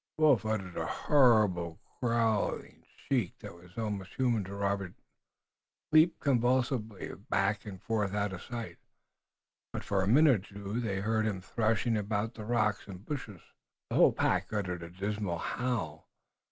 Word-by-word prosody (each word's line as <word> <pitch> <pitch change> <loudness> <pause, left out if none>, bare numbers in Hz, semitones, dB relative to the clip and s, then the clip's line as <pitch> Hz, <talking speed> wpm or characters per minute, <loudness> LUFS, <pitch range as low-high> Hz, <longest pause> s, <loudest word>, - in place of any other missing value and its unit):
The 155 - 0
wolf 135 -8 +5
uttered 95 -5 -2
a - - -1
horrible 105 - +3 0.2
growling 115 -3 0
shriek 120 -10 -1
that - - -9
was 85 +2 -17
almost 105 -4 -4
human 120 -5 +1
to 100 +2 -7
Robert, 100 -2 -2 1.0
leaped 155 +2 +5
convulsively 125 -4 0 0.2
back 100 +2 +1
and 95 -3 -7
out 105 -2 0
of 85 - -7
sight, 120 -2 -6 0.9
but - - -5
for 100 -1 0
a 95 - 0
minute 125 -5 +4
or - - -15
two 100 +3 -3
they 100 -5 -2
heard 110 +1 +1
him 100 -3 -2
threshing 110 +4 0
among 105 +1 -1
the 110 -2 -9
rocks 110 -4 0
and 95 +1 -10
bushes. 110 - -5 0.5
The - - -1
whole - - +7
pack - - 0
uttered 95 -5 -2
a 85 - -7
dismal 100 0 -3
howl. 100 -10 -3
105 Hz, 155 wpm, -31 LUFS, 95-120 Hz, 1.0 s, whole